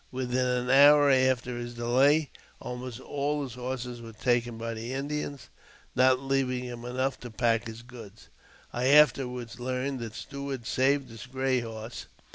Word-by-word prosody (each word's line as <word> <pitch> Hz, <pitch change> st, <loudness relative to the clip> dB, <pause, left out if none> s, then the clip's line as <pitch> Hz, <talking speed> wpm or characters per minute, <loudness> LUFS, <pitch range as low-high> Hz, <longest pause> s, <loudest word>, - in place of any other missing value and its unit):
Within 125 Hz, 0 st, -1 dB
an 125 Hz, 0 st, -1 dB
hour 145 Hz, +1 st, +7 dB
after 130 Hz, -2 st, +2 dB
his 120 Hz, 0 st, -6 dB
delay, 135 Hz, +5 st, +3 dB, 0.3 s
almost 125 Hz, -1 st, -6 dB
all 145 Hz, +2 st, -2 dB
his 130 Hz, -4 st, -6 dB
horses 125 Hz, -1 st, -5 dB
were 115 Hz, -1 st, -9 dB
taken 120 Hz, 0 st, 0 dB
by 115 Hz, 0 st, -4 dB
the 115 Hz, +3 st, -5 dB
Indians, 140 Hz, 0 st, -4 dB, 0.5 s
not 130 Hz, 0 st, +5 dB
leaving 135 Hz, -2 st, 0 dB
him 120 Hz, -1 st, -7 dB
enough 130 Hz, +2 st, -2 dB
ta 125 Hz, -, -8 dB
pack 115 Hz, -1 st, +1 dB
his 115 Hz, +1 st, -9 dB
goods. 110 Hz, -, -13 dB, 0.4 s
I 125 Hz, +1 st, 0 dB
afterwards 125 Hz, -4 st, +3 dB
learned 130 Hz, +2 st, -2 dB
that 115 Hz, -2 st, -6 dB
Stuart 140 Hz, -3 st, -6 dB
saved 135 Hz, 0 st, +1 dB
his 115 Hz, +2 st, -10 dB
gray 130 Hz, 0 st, 0 dB
horse. 115 Hz, 0 st, -7 dB
125 Hz, 155 wpm, -28 LUFS, 120-135 Hz, 0.5 s, hour